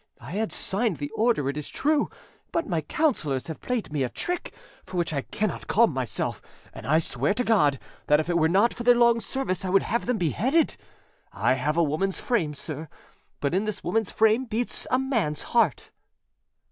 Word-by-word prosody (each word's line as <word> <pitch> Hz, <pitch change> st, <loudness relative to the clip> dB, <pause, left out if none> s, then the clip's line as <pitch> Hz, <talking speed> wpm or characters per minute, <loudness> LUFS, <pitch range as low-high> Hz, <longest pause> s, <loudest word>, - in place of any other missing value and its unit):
I -, -, -10 dB
had 215 Hz, +4 st, -1 dB
signed 200 Hz, -2 st, -1 dB
the 145 Hz, 0 st, -5 dB
order, 220 Hz, -, +1 dB
it 140 Hz, -, -1 dB
is 150 Hz, -, -5 dB
true; 300 Hz, 0 st, +1 dB, 0.4 s
but 335 Hz, -, 0 dB
my 170 Hz, -4 st, -1 dB
counsellors 150 Hz, -, 0 dB
have 160 Hz, -, -7 dB
played 240 Hz, -11 st, -3 dB
me 145 Hz, -, 0 dB
a 130 Hz, -, 0 dB
trick 355 Hz, -, -4 dB, 0.3 s
for 185 Hz, -1 st, -7 dB
which 170 Hz, -2 st, 0 dB
I 140 Hz, -, 0 dB
cannot 210 Hz, +7 st, -3 dB
calm 225 Hz, -6 st, +4 dB
myself; 130 Hz, -2 st, -2 dB, 0.3 s
and -, -, -9 dB
I 155 Hz, +3 st, +4 dB
swear 145 Hz, -, 0 dB
to 250 Hz, -, +1 dB
God 170 Hz, -, +3 dB, 0.3 s
that 150 Hz, 0 st, +5 dB
if 155 Hz, -, -2 dB
it 175 Hz, -, 0 dB
were 160 Hz, -1 st, +3 dB
not 200 Hz, +7 st, +4 dB
for -, -, -8 dB
their 245 Hz, 0 st, +6 dB
long 235 Hz, -1 st, +5 dB
service 230 Hz, -7 st, -3 dB
I 185 Hz, -, -2 dB
would 195 Hz, +1 st, +4 dB
have 235 Hz, +1 st, -1 dB
them 250 Hz, -2 st, +1 dB
beheaded. 250 Hz, -, +1 dB, 0.6 s
I -, -, +2 dB
have 145 Hz, +5 st, -1 dB
a 170 Hz, -, +5 dB
woman's 175 Hz, +6 st, 0 dB
frame, 170 Hz, -12 st, 0 dB
sir, 155 Hz, +1 st, -5 dB, 0.5 s
but 140 Hz, +2 st, 0 dB
in 195 Hz, +4 st, +1 dB
this 215 Hz, -2 st, -4 dB
woman's 215 Hz, +3 st, 0 dB
frame 220 Hz, +4 st, +3 dB
beats 230 Hz, +1 st, -2 dB
a 255 Hz, -, +3 dB
man's 230 Hz, -, -1 dB
heart." 220 Hz, -, +2 dB
195 Hz, 200 wpm, -26 LUFS, 150-235 Hz, 0.6 s, their